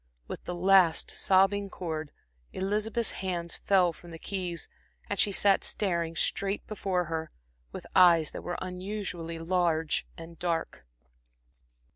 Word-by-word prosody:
With - - -7
the 180 - -4
last 185 -2 +4
sobbing 195 +1 +2
chord, 160 -5 -5 0.4
Elizabeth's 215 +4 -1
hands 175 -3 -3
fell 185 -4 +3
from 175 - -14
the 165 - -8
keys, 180 -2 -3 0.4
and 200 - -3
she 205 - +4
sat 195 0 +3
staring 170 -5 0
straight 195 +5 -1
before 190 -4 -1
her, 160 0 -4 0.4
with - - -8
eyes 170 -4 +6
that - - -7
were 175 - -4
unusually 185 -3 -5
large 165 -2 0
and 165 0 -11
dark. 165 - -3
180 Hz, 130 wpm, -29 LUFS, 165-195 Hz, 0.4 s, eyes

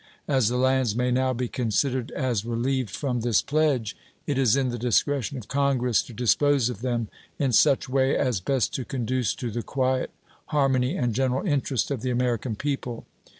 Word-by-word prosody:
As 130 -6 +2
the 125 - -1
lands 130 -3 +2
may 125 +1 +1
now 130 +1 +2
be 125 0 -2
considered 125 +2 -1
as 125 -7 -1
relieved 120 +1 -1
from 125 +3 -2
this 115 -3 +2
pledge, 140 -8 0 0.3
it 145 - -1
is 130 -4 +3
in 135 -2 +1
the 120 -1 -4
discretion 130 +3 0
of 120 - -9
Congress 135 -4 +1
to - - -11
dispose 125 +3 +2
of 115 -4 -6
them 120 -3 -1 0.3
in 135 -3 +1
such 130 +4 +4
way 130 +1 +2
as 125 -7 0
best 130 +6 0
to 130 - -2
conduce 125 -3 -1
to 120 -3 -4
the 120 - -3
quiet, 130 +1 -1 0.4
harmony, 135 +1 +1
and 120 -4 0
general 130 - 0
interest 140 - 0
of 135 -5 -2
the 130 - -2
American 120 -2 -1
people. 130 -2 -4
125 Hz, 185 wpm, -25 LUFS, 120-135 Hz, 0.4 s, such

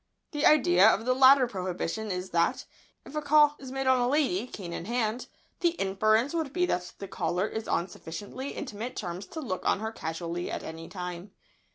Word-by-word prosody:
The 295 -1 +2
idea 200 -10 +6
of 225 +1 +1
the 255 - +3
latter 260 0 +7
prohibition 190 0 -3
is 180 0 -4
that, 175 +11 +1 0.4
if - - -11
a 305 - -1
call 295 0 +5
is 265 -1 -9
made 270 0 -2
on 260 -1 +4
a 245 - +2
lady 255 -7 +1
cane 180 -8 -7
in 170 - -5
hand, 235 +1 -1 0.3
the 345 -1 +2
inference 215 - +2
would 320 -5 -1
be 360 +4 +1
that 180 - -2
the 195 - -7
caller 175 +1 -1
is 220 0 -5
on 170 - 0
sufficiently 205 +10 -7
intimate 245 -2 -6
terms 180 0 -5
to 320 - -7
look 225 -11 -3
in - - -4
on - - +2
her 220 +1 -3
casually 170 -2 -4
at - - -4
any 165 +1 -8
time. 180 +1 -7
220 Hz, 205 wpm, -28 LUFS, 180-265 Hz, 0.4 s, latter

